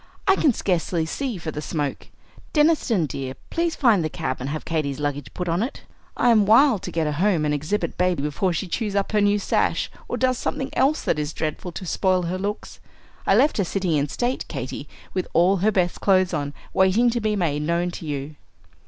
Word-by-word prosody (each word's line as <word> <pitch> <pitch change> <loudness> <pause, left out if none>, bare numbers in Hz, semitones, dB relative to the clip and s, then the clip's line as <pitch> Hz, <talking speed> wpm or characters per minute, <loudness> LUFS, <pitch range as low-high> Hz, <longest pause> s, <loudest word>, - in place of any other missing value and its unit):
"I 390 - +6
can 300 - +3
scarcely 175 -5 0
see 245 - -3
for 165 -2 -5
the 150 - -5
smoke. 145 -3 -3 0.5
Deniston, 295 - +3
dear, 135 -2 -5 0.2
please 335 -1 0
find 225 - +3
the 155 - -1
cab, 130 - -3
and 130 +2 -4
have 155 +1 -4
Katy's 150 -4 -2
luggage 145 -2 -3
put 180 - -3
on 170 +3 +1
it. 245 +5 -4 0.3
I 240 - +4
am 215 -3 +4
wild 230 -1 +5
to - - -6
get 165 -1 0
her 150 - 0
home, 170 0 +1
and 150 - +1
exhibit 155 +9 -2
baby 180 -5 +1
before 150 +6 0
she 175 +3 -2
chews 205 +2 -2
up 200 -1 0
her 210 -1 +2
new 205 0 +3
sash 205 - 0 0.2
or - - -3
does 255 -1 +1
something 270 0 -3
else 295 +3 +2
that 150 - 0
is 150 +1 -3
dreadful, 160 +3 -3
to 185 - -6
spoil 185 +1 +1
her 180 +2 -2
looks. 205 +2 -4 0.5
I - - +5
left 300 - +4
her 200 - +2
sitting 185 0 -1
in 145 -1 +1
state, 245 - -1
Katy, - - -6 0.2
with 185 - -2
all 180 +4 +4
her 205 +4 +2
best 180 -3 0
clothes 185 -2 +3
on, 145 -2 -2 0.2
waiting 200 +6 +4
to 240 0 -1
be 215 -1 0
made 155 -7 0
known 170 +3 0
to 165 - -8
you." 145 +1 -4
180 Hz, 215 wpm, -23 LUFS, 155-210 Hz, 0.5 s, I